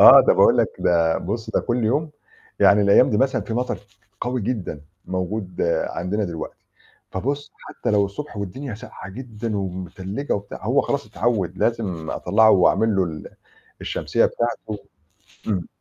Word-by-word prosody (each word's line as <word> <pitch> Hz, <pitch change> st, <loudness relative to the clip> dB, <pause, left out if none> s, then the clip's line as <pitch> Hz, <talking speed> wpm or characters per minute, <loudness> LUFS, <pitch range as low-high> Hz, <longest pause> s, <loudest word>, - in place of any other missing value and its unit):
آه، -, -, +11 dB
ده -, -, +7 dB
باقول -, -, +5 dB
لك -, -, +4 dB
ده 85 Hz, -2 st, +2 dB
بُصّ 110 Hz, +4 st, -4 dB
ده -, -, +1 dB
كُلّ 120 Hz, -1 st, -1 dB
يوم، 150 Hz, +7 st, +1 dB, 0.5 s
يعني 100 Hz, +1 st, +6 dB
الأيام 100 Hz, +5 st, +6 dB
دي 105 Hz, -, +2 dB
مثلًا 135 Hz, 0 st, +2 dB
في 115 Hz, -, -5 dB
مطر 125 Hz, -6 st, -1 dB, 0.4 s
قوي 125 Hz, +1 st, -1 dB
جدًا 100 Hz, -, -3 dB, 0.2 s
موجود 95 Hz, 0 st, -3 dB, 0.2 s
عندنا 100 Hz, +4 st, -2 dB
دلوقتي، 85 Hz, -4 st, -5 dB, 0.6 s
فبُصّ 140 Hz, +9 st, -3 dB
حتى -, -, -4 dB
لو 105 Hz, -1 st, +4 dB
الصبح 110 Hz, +5 st, -7 dB
والدنيا 105 Hz, +6 st, -5 dB
ساقعة 105 Hz, -2 st, -10 dB
جدًا 115 Hz, -1 st, -5 dB
ومتلّجة 95 Hz, -, -4 dB
وبتاع، 100 Hz, 0 st, -6 dB
هو -, -, +3 dB
خلاص -, -, -2 dB
اتعوّد، 95 Hz, -7 st, -1 dB
لازم 95 Hz, -9 st, -1 dB
أطلّعه 110 Hz, +4 st, +4 dB
وأعمل 105 Hz, +3 st, +4 dB
له 95 Hz, -, +3 dB
ال 80 Hz, -3 st, -6 dB, 0.5 s
الشمسيّة -, -, +1 dB
بتاعته 120 Hz, -3 st, -2 dB, 0.7 s
امم. 95 Hz, -6 st, -1 dB
105 Hz, 150 wpm, -23 LUFS, 95-120 Hz, 0.7 s, آه